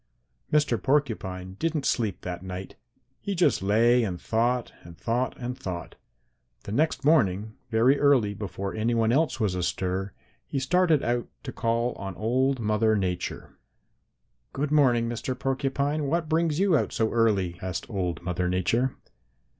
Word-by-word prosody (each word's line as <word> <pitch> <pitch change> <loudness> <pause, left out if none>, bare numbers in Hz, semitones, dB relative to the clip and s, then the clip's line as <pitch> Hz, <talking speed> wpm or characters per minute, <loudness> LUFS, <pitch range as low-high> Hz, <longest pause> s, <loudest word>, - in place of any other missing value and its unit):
"Mr. 150 -7 +2
Porcupine 105 -10 -1
didn't 155 -4 -1
sleep 110 -6 0
that 90 -1 -5
night. 95 0 -7 0.4
He 200 -1 -3
just 175 - +3
lay 115 +5 +4
and 90 -5 -3
thought 120 +4 0
and 85 -1 -13
thought 120 +3 -1
and 125 0 -4
thought. 90 -7 -6 0.7
The - - -7
next 145 +3 0
morning, 110 - +3 0.2
very 120 +5 +3
early, 130 -8 +4
before 100 -1 -5
any 115 +2 0
one 115 -1 +2
else 150 +3 +1
was 105 -5 +1
astir, 90 +2 -2 0.3
he - - -3
started 160 +2 +2
out 120 0 0 0.2
to 135 - -5
call 115 +1 0
on 95 -1 -6
old 130 +4 +1
Mother 110 0 +2
Nature. 90 -3 -3 0.9
"'Good 145 +2 -2
morning, 125 -6 +4
Mr. 120 +2 -3
Porcupine, 140 +3 -1
what 165 +2 0
brings 160 0 +1
you 195 -3 +4
out - - +1
so 110 -1 0
early?' 100 -7 +1
asked 95 -1 -4
old 90 -7 -3
Mother 90 0 -1
Nature. 115 +8 +1
115 Hz, 150 wpm, -26 LUFS, 95-135 Hz, 0.9 s, lay